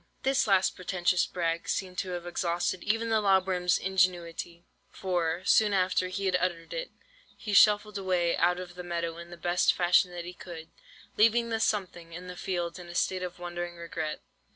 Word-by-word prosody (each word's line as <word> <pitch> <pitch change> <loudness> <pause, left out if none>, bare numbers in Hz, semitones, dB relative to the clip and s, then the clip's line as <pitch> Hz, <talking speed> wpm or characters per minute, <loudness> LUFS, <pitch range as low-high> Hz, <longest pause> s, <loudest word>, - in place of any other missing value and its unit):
"This 265 -2 +2
last 190 -2 +3
pretentious 180 -1 +1
brag 165 -1 -2
seemed 185 -1 -2
to 190 - -3
have 175 -1 -5
exhausted 175 +1 -1
even 225 +2 0
the 220 -1 +2
lob 190 -2 +4
worm's 180 -2 +1
ingenuity, 175 -2 -1 0.2
for, 175 -2 -2
soon 210 -2 +4
after 185 -1 +2
he 195 +2 -4
had 185 -1 +2
uttered 175 -2 -2
it, - - -4 0.5
he 210 - -5
shuffled 210 0 +5
away 180 -3 +1
out 180 +1 +2
of 180 -1 -8
the 180 - -8
meadow 170 -1 -3
in 170 0 -10
the 175 - -10
best 175 +2 +2
fashion 180 +1 +3
that 175 -1 -7
he 180 - -7
could, 170 -3 -10 0.5
leaving 230 +2 +4
the 225 -1 -1
'something' 185 -6 -2
in 180 +2 -8
the 180 0 -8
field 175 -1 -3
in 175 - -10
a 175 - -9
state 185 +1 0
of 180 -1 -5
wondering 175 0 -5
regret. 165 -2 -5
180 Hz, 190 wpm, -29 LUFS, 175-190 Hz, 0.5 s, shuffled